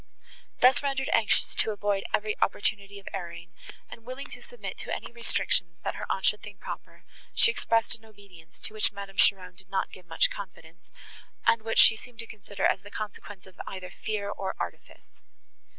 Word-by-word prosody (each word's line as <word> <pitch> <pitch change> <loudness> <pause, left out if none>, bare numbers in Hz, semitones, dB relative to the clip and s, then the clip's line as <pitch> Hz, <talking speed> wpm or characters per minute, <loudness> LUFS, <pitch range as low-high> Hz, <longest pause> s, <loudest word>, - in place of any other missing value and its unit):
Thus 255 +1 +7
rendered 275 -1 -1
anxious 220 - +4
to - - +2
avoid 205 -2 0
every 215 0 +1
opportunity 200 -1 0
of 200 - -13
erring, 175 -1 -6 0.3
and 230 - -11
willing 255 +4 -6
to - - -4
submit 485 - -8
to - - -4
any - - -3
restrictions, 185 -6 0
that - - -1
her - - -5
aunt 190 - 0
should 210 - +4
think 205 -2 -10
proper, - - -8 0.3
she 465 - +7
expressed 230 - +2
an 225 -1 -8
obedience, 200 -6 -17
to 215 - -3
which 215 - +2
Madame 200 -1 -8
Cheron 185 -2 +4
did 190 +1 -12
not 195 - -1
give 180 -2 -13
much 165 - +3
confidence, 180 -2 -10 0.6
and 230 -1 +5
which 225 0 -2
she 225 - +9
seemed 240 +1 -11
to 230 - -6
consider 200 -2 -4
as - - +3
the 205 - -11
consequence 205 -2 -7
of 190 -1 -10
either 185 -2 -6
fear, 210 -2 -3
or 190 -2 -3
artifice. - - -7
205 Hz, 185 wpm, -28 LUFS, 190-225 Hz, 0.6 s, she